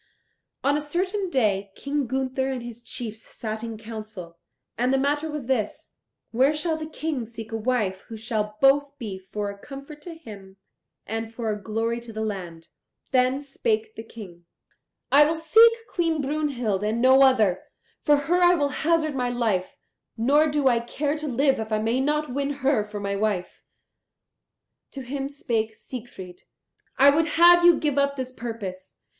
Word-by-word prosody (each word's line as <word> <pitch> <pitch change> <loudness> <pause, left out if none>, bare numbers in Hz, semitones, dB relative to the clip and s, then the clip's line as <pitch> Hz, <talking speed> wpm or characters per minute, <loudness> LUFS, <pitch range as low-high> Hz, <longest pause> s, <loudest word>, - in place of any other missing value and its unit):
On 280 +1 +3
a 300 - 0
certain 370 +6 -2
day 205 - +1
King 280 -1 -2
Gunther 265 +1 -1
and 255 -3 -3
his 240 0 -9
chiefs 225 -2 -6
sat 220 -1 -6
in 225 -1 -5
council, 215 -6 -9 0.4
and 250 +2 +1
the 270 - +3
matter 290 +3 0
was 300 -4 -5
this 245 -5 -2 0.4
where 265 +6 +3
shall 320 +1 0
the 315 0 -5
King 310 -5 -3
seek 225 0 -9
a - - -3
wife 215 -5 -1
who 225 - -8
shall 215 -2 -3
both 285 +1 +4
be 205 -7 -6
for 205 -1 -2
a 200 - -13
comfort 280 +4 -10
to 335 +2 -9
him 200 -10 -12 0.5
and 225 +1 -4
for 230 -1 -3
a 210 -1 -4
glory 225 +2 -2
to 235 -1 -10
the 220 0 -3
land? 175 -6 -6 0.4
Then 260 +1 +2
spake 435 - -1
the - - -7
King, 195 -7 -12 0.7
"I 285 +2 +8
will 310 +2 +1
seek 445 +9 +6 0.2
Queen 330 -3 +1
Brunhild 270 -8 -1
and 215 +2 0
no 260 +2 +6
other. 220 -9 +4 0.4
For 295 - +4
her 355 +1 +4
will 285 -2 +1
I - - -7
hazard 315 -1 +2
my 250 -2 -1
life; 225 -7 -1 0.4
nor 285 +7 +4
do 295 -2 +1
I 240 -2 +4
care 285 +5 -2
to 305 0 -5
live 270 0 +2
if 220 0 -5
I 215 - +2
may 225 +4 0
not 300 -1 0
win 280 +1 -1 0.2
her 265 -6 +3
for 210 0 -7
my 200 0 -2
wife." 200 -3 -2 1.3
To 275 - -6
him 270 +2 -4
spake 225 -6 -2
Siegfried, 205 -9 -9 0.6
"I 280 +1 +7
would 320 +3 +2
have 345 +1 +8
you 345 -2 +7
give 290 -2 0
up 280 0 +1
this 260 -2 -4
purpose. 220 -7 -7
255 Hz, 175 wpm, -25 LUFS, 220-290 Hz, 1.3 s, I